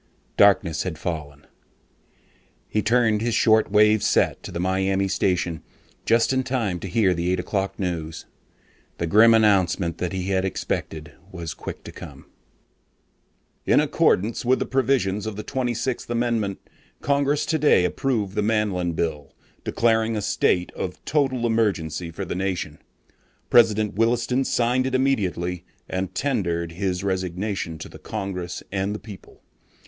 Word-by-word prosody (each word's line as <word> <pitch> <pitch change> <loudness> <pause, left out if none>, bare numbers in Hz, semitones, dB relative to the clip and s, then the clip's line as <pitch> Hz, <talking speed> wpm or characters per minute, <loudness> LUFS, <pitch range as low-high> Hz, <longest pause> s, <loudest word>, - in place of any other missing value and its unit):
Darkness 95 -5 +4
had 90 -4 -4
fallen. 75 -4 -5 1.2
He 105 - 0
tuned 110 -1 +2
his 115 0 0
short 110 -1 +4
wave 105 0 +5
set - - +2
to - - -8
the 85 - -4
Miami 95 +1 +1
station 90 -4 0 0.5
just 115 +3 +3
in 130 - +2
time 120 -9 -2
to 95 - -6
hear 95 0 +2
the 85 +1 -1
eight 95 - 0
o'clock 95 +2 -2
news. 80 -4 -4 0.7
The 85 - -1
grim 110 +7 +6
announcement 95 -5 +2
that 90 - -2
he 95 0 -3
had 95 -1 +1
expected 80 -5 -4 0.2
was 85 -3 -6
quick - - -8
to - - -9
come: - - -11 1.4
"In - - +5
accordance 110 +5 +1
with 130 +2 +3
the - - -2
provisions 120 -6 0
of 110 - -4
the 105 - -6
Twenty 125 -3 -2
Sixth 120 +1 -3
Amendment, 115 -4 0 0.4
Congress 140 +1 +1
today 150 - +3
approved 105 -3 -1
the 105 - 0
Manlin 105 -5 0
Bill, 75 -4 -3 0.3
declaring 115 -1 +1
a - - -2
state 90 -1 +1
of 90 - -6
total 135 -5 +1
emergency 90 -8 0
for 80 - -6
the - - -4
nation. 90 -5 -3 0.7
President 110 -3 +4
Williston 120 +4 +1
signed 125 +2 +1
it 130 - -1
immediately 90 -10 0 0.2
and 95 0 -3
tendered 85 -11 -1
his 90 +1 -2
resignation 95 -2 -2
to - - -8
the - - -13
Congress 95 -4 -5
and 100 +1 -1
the - - -5
people. 105 -4 -13
100 Hz, 145 wpm, -23 LUFS, 90-115 Hz, 1.4 s, grim